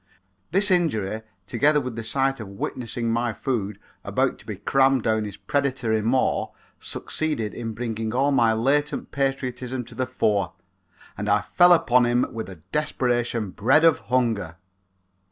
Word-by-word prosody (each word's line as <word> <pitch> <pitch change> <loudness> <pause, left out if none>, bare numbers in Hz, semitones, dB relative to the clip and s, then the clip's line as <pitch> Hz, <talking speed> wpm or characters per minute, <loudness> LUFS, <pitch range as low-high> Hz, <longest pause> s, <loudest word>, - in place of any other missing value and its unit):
This 195 +4 +2
injury, 110 - +1 0.2
together 145 +9 +3
with 125 -4 -5
the 115 - -4
sight 135 +3 0
of 110 - -6
witnessing 115 +3 -3
my 115 0 0
food 105 -5 -2 0.3
about - - 0
to - - -16
be - - -4
crammed 135 -2 +2
down 110 -1 +1
his 105 -1 -7
predatory 130 -5 0
maw, 125 +4 +1 0.3
succeeded 150 -10 -3
in 115 -2 -5
bringing 115 -2 -3
all 135 +4 +2
my 115 -4 +4
latent 140 +7 0
patriotism 130 -2 -2
to - - -12
the 130 -1 -2
fore 105 -7 0 0.6
and - - -3
I - - +4
fell 175 0 +4
upon 125 -7 +5
him 120 +1 +2
with 110 -3 -5
a 95 - -8 0.2
desperation 120 -7 0
bred 130 - +3
of 165 - +5
hunger. 115 -9 0
120 Hz, 155 wpm, -24 LUFS, 110-135 Hz, 0.6 s, upon